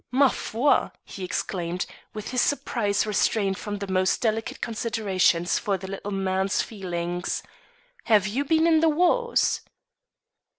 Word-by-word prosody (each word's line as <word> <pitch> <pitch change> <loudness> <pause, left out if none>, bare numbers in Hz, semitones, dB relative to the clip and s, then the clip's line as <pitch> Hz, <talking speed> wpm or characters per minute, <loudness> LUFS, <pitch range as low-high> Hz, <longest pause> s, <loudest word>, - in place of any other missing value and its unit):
"Ma 270 +2 +4
foi!" 255 +5 +1
he 195 - -8
exclaimed, 180 -1 -2 0.3
with 215 -1 -6
his 250 -1 +2
surprise 215 -8 0
restrained 205 -1 +1
from 205 -1 -4
the 200 - -4
most 185 0 +2
delicate 225 -1 -1
considerations 205 -7 +1
for 200 -4 -1
the 190 - -9
little 195 +1 -6
man's 190 0 0
feelings; 175 -4 -3 0.6
"have 210 -3 +4
you 230 +7 -1
been 320 +2 +2
in 325 -1 +5
the 325 0 +4
wars?" 360 +10 +2
205 Hz, 135 wpm, -25 LUFS, 190-250 Hz, 0.6 s, in